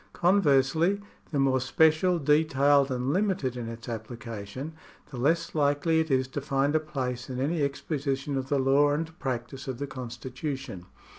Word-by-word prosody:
Conversely, 170 0 +3 0.3
the 150 - -2
more 135 -1 +3
special, 160 +6 +3
detailed, 145 -2 +3
and 130 +2 -1
limited 185 -10 0
in 120 -2 -5
its 115 +1 -9
application, 115 +3 -6 0.4
the 130 - -7
less 150 +7 +1
likely 150 +2 +2
it 160 0 0
is 130 -1 +2
to 140 +2 -4
find 140 +1 +1
a - - +5
place 130 -5 -4
in 130 -1 -4
any 150 +4 0
exposition 140 0 -2
of 135 0 -3
the 145 - +2
law 135 +2 +4
and 160 +2 -4
practice 130 0 -4
of 130 -2 -3
the 145 - -3
constitution. 130 - -6
140 Hz, 160 wpm, -28 LUFS, 130-155 Hz, 0.4 s, a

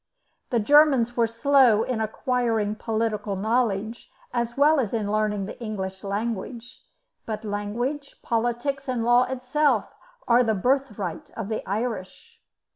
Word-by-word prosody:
The 240 - +1
Germans 265 -1 +4
were 235 -1 +3
slow 230 -1 +4
in 235 -3 -2
acquiring 225 -1 0
political 215 -2 -2
knowledge 220 +1 -1 0.2
as 240 0 -2
well 295 +2 +5
as 235 -3 -1
in 210 -2 -1
learning 210 -2 0
the 210 - -9
English 190 -4 -5
language; 225 +4 -4 0.5
but 220 0 -4
language, 235 +8 -3
politics, 240 +4 -1
and 250 -3 -1
law 240 +1 +5
itself 260 +3 0 0.3
are 245 +1 +5
the 220 -2 +1
birthright 250 - -1
of 220 -3 -4
the 220 - -3
Irish. 235 - -4
230 Hz, 130 wpm, -25 LUFS, 210-255 Hz, 0.5 s, well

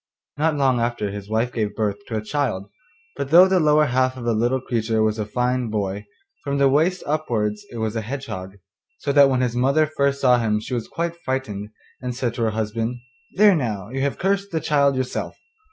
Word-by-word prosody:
Not 155 +1 +1
long 135 -4 +2
after 115 -2 -1
this 100 - -3
his 100 0 -7
wife 115 +3 0
gave 105 -3 -2
birth 105 -2 -1
to 115 - -4
a 105 - -3
child, 110 -6 -2 0.4
but 135 - -4
though 175 +5 +8
the 190 -1 +3
lower 150 -1 +4
half 130 -1 +1
of 125 - -7
the 120 - +2
little 120 +4 +1
creature 115 -3 0
was 110 0 0
a 105 - -2
fine 125 +1 0
boy, 105 -1 -3 0.4
from 140 0 -1
the 140 0 +4
waist 160 +7 +2
upwards 115 -9 -1
it 120 - -7
was 110 0 -2
a 115 - -1
hedgehog, 105 -6 -6 0.4
so 140 - -2
that 140 -1 +6
when 130 -1 +1
his 125 -2 0
mother 140 +5 +3
first 140 -2 0
saw 125 -3 +4
him 105 -2 +1
she 110 - -7
was 120 -3 -2
quite 170 0 -3
frightened, 110 -6 -3 0.3
and 125 -1 -4
said 120 -2 -1
to 120 - -5
her 115 - +2
husband, 110 +2 -2 0.4
'There 205 0 +6
now, 110 - -3
you 135 +2 -3
have 140 0 -1
cursed 200 +1 0
the 160 - 0
child 140 -2 +2
yourself. 130 -1 -3
125 Hz, 220 wpm, -22 LUFS, 110-140 Hz, 0.4 s, though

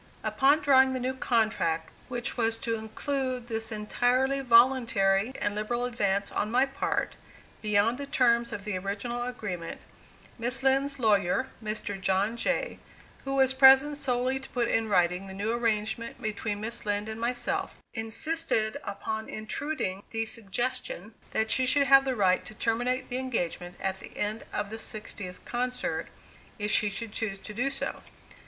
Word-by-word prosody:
Upon 285 +3 +3
drawing 265 -2 +5
the 260 - -2
new 255 +1 -1
contract 220 -11 0 0.2
which 245 +1 -3
was 225 -2 +1
to 230 - -2
include 255 +3 -3
this 225 -2 -3
entirely 245 +5 +1
voluntary 235 -4 +4
and 205 - 0
liberal 240 +4 -1
advance 200 -5 0
on 210 - -1
my 250 +4 +4
part, 275 0 -2 0.4
beyond 215 +4 +2
the 280 - -5
terms 235 -4 +3
of 205 -4 -5
the 210 -3 -2
original 200 +5 -3
agreement, 210 -9 -5 0.6
Miss 245 +3 -1
Lind's 270 +1 +2
lawyer, 215 +1 +2
Mr. 210 -2 -4
John 195 +4 +1
Jay, 235 - -1 0.5
who 270 0 -1
was 265 -1 +4
present 270 +2 +7
solely 255 -1 0
to 265 - -11
put 240 -2 0
in 225 -1 +1
writing 180 0 +2
the 190 - -8
new 205 +3 -1
arrangement 230 0 -1
between 210 -1 -3
Miss 230 +2 -5
Lind 205 0 -1
and 220 +1 -6
myself, 245 +1 -2 0.2
insisted 225 +1 0
upon 220 +2 -4
intruding 215 -3 -3
the 225 0 -2
suggestion 230 -1 -1 0.2
that 220 0 0
she 260 0 +4
should 280 +2 +4
have 270 0 +7
the 260 -1 0
right 185 -4 +3
to 215 - -8
terminate 245 +4 0
the 250 - 0
engagement 180 -8 -2
at 190 0 -2
the - - -12
end 215 +2 -2
of 205 - -3
the 225 - -5
sixtieth 205 -4 -6
concert, 250 +1 -2 0.5
if 210 -1 -2
she 210 - +4
should 210 +2 -4
choose 210 -2 -3
to 210 +2 -9
do 245 +6 0
so. 275 0 -3
230 Hz, 160 wpm, -28 LUFS, 210-255 Hz, 0.6 s, present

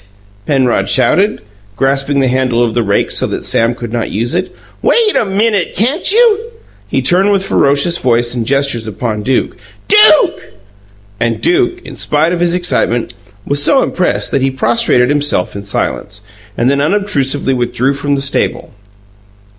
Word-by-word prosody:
Penrod 130 -4 +1
shouted, 205 +3 +1 0.3
grasping 135 +2 0
the 130 - +1
handle 125 -2 0
of 115 -2 -1
the 120 - 0
rake 100 -2 0
so - - 0
that - - -5
Sam 115 +1 +1
could 120 -2 -7
not 120 -1 -2
use 115 +4 -2
it. 180 +2 -2 0.3
"Wait 450 -3 +2
a - - +2
MINUTE, 205 -1 -1
can't 265 - +1
you?" 450 -1 +4 0.5
He - - -2
turned 190 +3 +3
with 195 -1 0
ferocious 145 +2 +2
voice 120 -1 0
and 120 -2 -3
gestures 135 -5 0
upon 110 +1 -4
Duke. 130 +5 -1 0.3
"DUKE!" 420 -7 +4 0.7
And 115 -1 -1
Duke, 360 +1 0
in - - -9
spite 155 +4 0
of 175 - -2
his 175 0 +1
excitement, 150 -9 -1 0.3
was 145 0 0
so 270 - +3
impressed 180 - -1
that 140 - 0
he 135 - +1
prostrated 130 - +1
himself 145 -12 -1
in 100 - -6
silence, 105 +1 -4 0.4
and 120 - +1
then 140 +1 +1
unobtrusively 145 -7 0
withdrew 125 +2 -1
from 140 +1 -2
the 135 - -2
stable. 140 - -2
140 Hz, 160 wpm, -13 LUFS, 120-190 Hz, 0.7 s, you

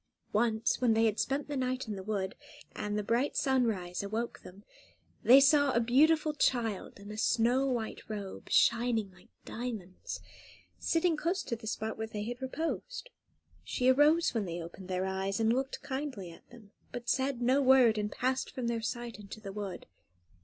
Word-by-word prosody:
Once, 220 +1 +1
when 235 -3 +4
they 225 +1 +4
had 220 -1 +1
spent 275 +2 -1
the 295 - -4
night 255 -1 -1
in 210 - -3
the 190 - -6
wood, 195 -1 -2 0.4
and 210 0 -2
the 210 - -1
bright 235 +7 0
sunrise 225 -10 +1
awoke 220 +4 -3
them, 195 +3 -13 0.6
they 255 +4 +8
saw 285 +1 +5
a - - +3
beautiful 300 +6 +3
child, 230 -9 0
in 205 +1 -9
a 215 - -7
snow 245 +4 +2
white 235 -4 -2
robe, 200 -3 -6
shining 230 -3 +3
like 180 -1 -20 0.2
diamonds, 220 -7 -6 0.6
sitting 330 0 +2
close 345 +5 -1
to 235 - -3
the 220 -1 -10
spot 220 0 -3
where 220 - -2
they 210 -1 -5
had 240 +3 -5
reposed. 330 - -4 0.5
She 250 0 +1
arose 295 +5 +4
when 220 -4 -1
they 170 -1 -4
opened 170 +2 -9
their 185 0 -1
eyes, 190 +1 -2
and 225 0 +3
looked 265 +2 -2
kindly 265 - -4
at 165 - -17
them; 230 -4 -15 0.2
but 240 0 -7
said 265 0 0
no 255 +3 +3
word, 255 -5 +5
and 210 0 -2
passed 255 +1 -1
from 255 - -5
their 235 -1 -1
sight 240 0 -4
into 205 +1 -9
the 200 -2 -8
wood. 200 -2 -5
235 Hz, 180 wpm, -31 LUFS, 210-265 Hz, 0.6 s, they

